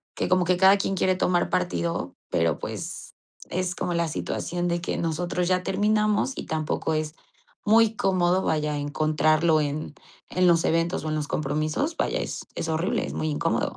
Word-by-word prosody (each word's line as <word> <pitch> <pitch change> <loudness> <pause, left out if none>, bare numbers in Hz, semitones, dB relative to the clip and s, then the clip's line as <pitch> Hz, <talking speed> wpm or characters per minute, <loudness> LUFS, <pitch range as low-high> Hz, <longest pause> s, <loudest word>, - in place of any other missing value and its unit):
que - - -1
como 185 0 +4
que 180 0 +2
cada 190 +1 +7
quien 195 0 -1
quiere 185 0 +2
tomar 180 -1 +1
partido, 170 - -1 0.2
pero 80 -2 +1
pues - - -6 0.4
es 180 0 -1
como 175 - -2
la 170 -1 0
situación 175 +3 -3
de 170 0 -1
que - - -3
nosotros 175 +2 -1
ya 185 0 +1
terminamos 210 +4 +1
y - - -6
tampoco 160 0 -2
es 155 0 -2 0.5
muy 225 +1 +5
cómodo, 185 -1 +2
vaya, 150 -1 0
encontrarlo 155 +2 +2
en 150 +1 -3 0.4
en 180 0 +1
los 170 -1 +4
eventos 165 0 0
o - - -1
en 155 - -1
los 150 -1 -3
compromisos. 155 - -1
Vaya, - - 0
es - - -4
es - - -3
horrible, 180 +9 0
es - - -6
muy 155 - -2
incómodo. 145 - 0
170 Hz, 180 wpm, -25 LUFS, 155-185 Hz, 0.5 s, cada